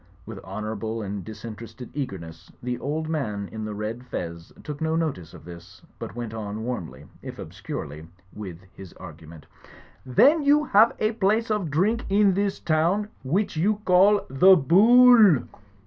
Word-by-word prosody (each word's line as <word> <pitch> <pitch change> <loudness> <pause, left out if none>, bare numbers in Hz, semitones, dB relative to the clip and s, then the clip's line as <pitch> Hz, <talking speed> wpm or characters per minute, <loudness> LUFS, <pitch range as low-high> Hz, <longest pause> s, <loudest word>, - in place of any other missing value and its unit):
With - - -9
honourable 110 +4 -5
and 100 -1 -5
disinterested 115 +2 -10
eagerness, 95 - -7
the 125 0 -3
old 155 +3 -3
gentleman 110 -11 -3
in 110 -1 -6
the 105 -1 -6
red 110 +4 -5
fez 85 -6 -6
took 150 -1 -7
no 160 0 0
notice 140 - -3
of - - -14
this, 85 0 -13 0.2
but - - -7
went 120 -2 -6
on 110 0 -6
warmly, 80 - -6 0.2
if - - -9
obscurely, 75 +3 -8 0.3
with 95 -5 -9
his 95 -3 -12
argument 80 -2 -13 0.6
''Then 285 - +4
you 290 +1 +4
have 220 0 +4
a 215 - 0
place 220 +1 0
of 205 -6 -1
drink 205 +11 0
in 200 0 +3
this 200 +1 -1
town 170 +7 0
which 180 +10 -1
you 195 +7 +1
call 195 +3 +4
The 185 +9 +6
Bool!" 215 - +6
130 Hz, 155 wpm, -24 LUFS, -, 0.6 s, The